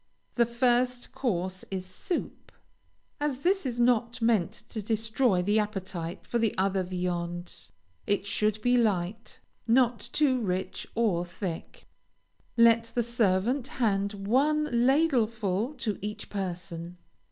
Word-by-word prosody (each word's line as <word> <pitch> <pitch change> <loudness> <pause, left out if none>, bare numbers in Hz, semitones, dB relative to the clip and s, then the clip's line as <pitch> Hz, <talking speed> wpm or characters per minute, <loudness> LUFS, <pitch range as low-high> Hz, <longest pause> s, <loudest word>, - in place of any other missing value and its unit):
The 235 -2 +3
first 245 +1 +1
course 185 -6 -2
is 190 -1 -4
soup. 185 - -5 0.7
As 285 -2 -2
this 375 -4 +2
is 240 -1 -3
not 240 0 +2
meant 225 -7 +1
to 220 - -4
destroy 220 -2 +1
the 205 +3 +3
appetite 190 -5 -4
for 235 - -1 0.2
other 190 0 +1
viands, 175 -7 -4 0.4
it 200 -1 +1
should 210 +1 0
be 245 0 +4
light, 210 -1 -1 0.3
not 240 -1 +4
too 265 -4 +2
rich 185 -2 -3
or 205 -7 +2
thick. 175 -1 -6 0.7
Let 230 0 +6
the 240 - +2
servant 235 +3 +1
hand 210 -8 0
one 270 +10 +2
ladlefull 235 - +2
to 210 -3 -2
each 210 +2 -6
person. 175 -3 -5
220 Hz, 120 wpm, -28 LUFS, 185-245 Hz, 0.7 s, Let